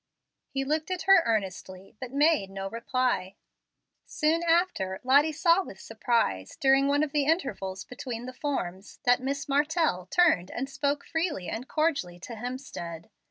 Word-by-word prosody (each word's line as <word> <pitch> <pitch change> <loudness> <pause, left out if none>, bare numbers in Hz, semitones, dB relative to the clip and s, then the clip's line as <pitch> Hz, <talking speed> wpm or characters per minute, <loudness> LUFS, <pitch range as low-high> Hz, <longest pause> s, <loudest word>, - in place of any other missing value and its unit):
He 270 0 -2
looked 305 +5 -1
at 370 -1 -2
her 390 -2 +7
earnestly, 195 -2 -3
but 255 -2 -6
made 290 -7 +3
no 195 0 -5
reply. 230 -3 -1 0.7
Soon 320 +2 +1
after, 335 - +1
Lottie 285 +5 +5
saw 335 +4 +3
with 190 - -11
surprise, 220 - -1
during 270 0 +4
one 285 +1 +3
of 300 - -2
the 290 -1 +1
intervals 270 - -1
between 245 -1 -6
the 255 - -7
forms, 205 -10 -4
that 245 +1 +4
Miss 275 +2 -3
Martell 290 - +1
turned 310 - +3
and 265 +2 -4
spoke 280 +1 -1
freely 320 - -2
and 245 +4 -5
cordially 280 - -1
to 235 - -8
Hemstead. 220 - -7
270 Hz, 155 wpm, -28 LUFS, 195-305 Hz, 0.7 s, her